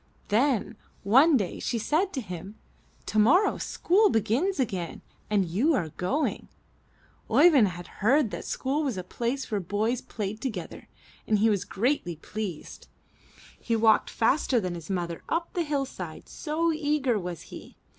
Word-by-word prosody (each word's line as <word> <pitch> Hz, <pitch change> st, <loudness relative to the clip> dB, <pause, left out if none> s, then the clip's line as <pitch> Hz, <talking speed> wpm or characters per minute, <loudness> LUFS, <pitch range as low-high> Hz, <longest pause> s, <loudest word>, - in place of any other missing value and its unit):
Then 230 Hz, -1 st, +1 dB, 0.3 s
one 270 Hz, +9 st, +6 dB
day 195 Hz, -6 st, -3 dB
she 240 Hz, -, -2 dB
said 315 Hz, -, +1 dB
to 265 Hz, -, -2 dB
him: 190 Hz, 0 st, -8 dB, 0.3 s
* -, -, -34 dB
'Tomorrow 255 Hz, -, +3 dB
school 410 Hz, +4 st, +2 dB
begins 270 Hz, -, +1 dB
again 185 Hz, -9 st, -3 dB, 0.3 s
and 205 Hz, -3 st, +2 dB
you 225 Hz, -, +2 dB
are 170 Hz, -8 st, -1 dB
going/' 255 Hz, -, -2 dB, 0.8 s
Oeyvind 290 Hz, -11 st, +6 dB
had 175 Hz, -1 st, -6 dB, 0.2 s
heard 250 Hz, +2 st, +3 dB
that -, -, -5 dB
school 275 Hz, +3 st, -1 dB
was 265 Hz, -9 st, -2 dB
a 185 Hz, -, -4 dB
place 245 Hz, +7 st, -3 dB
where 210 Hz, -, +1 dB
boys 215 Hz, +7 st, -1 dB
played 215 Hz, +1 st, -5 dB
together 210 Hz, -11 st, -5 dB, 0.4 s
and 215 Hz, -, +3 dB
he 220 Hz, +2 st, +3 dB
was 200 Hz, -3 st, -1 dB
greatly 215 Hz, -, -1 dB
pleased. 185 Hz, 0 st, -7 dB, 0.7 s
He 230 Hz, -, -1 dB
walked 220 Hz, -1 st, +4 dB
faster 250 Hz, +1 st, +2 dB
than 185 Hz, -4 st, -3 dB
his 170 Hz, 0 st, -8 dB
mother 175 Hz, -3 st, -3 dB
up 335 Hz, 0 st, -1 dB
the 350 Hz, -, 0 dB
hill 290 Hz, -4 st, -1 dB
side, -, -, -8 dB
so 330 Hz, +1 st, -1 dB
eager 290 Hz, -7 st, 0 dB
was 175 Hz, -3 st, -6 dB
he. -, -, -11 dB
225 Hz, 155 wpm, -27 LUFS, 195-290 Hz, 0.8 s, one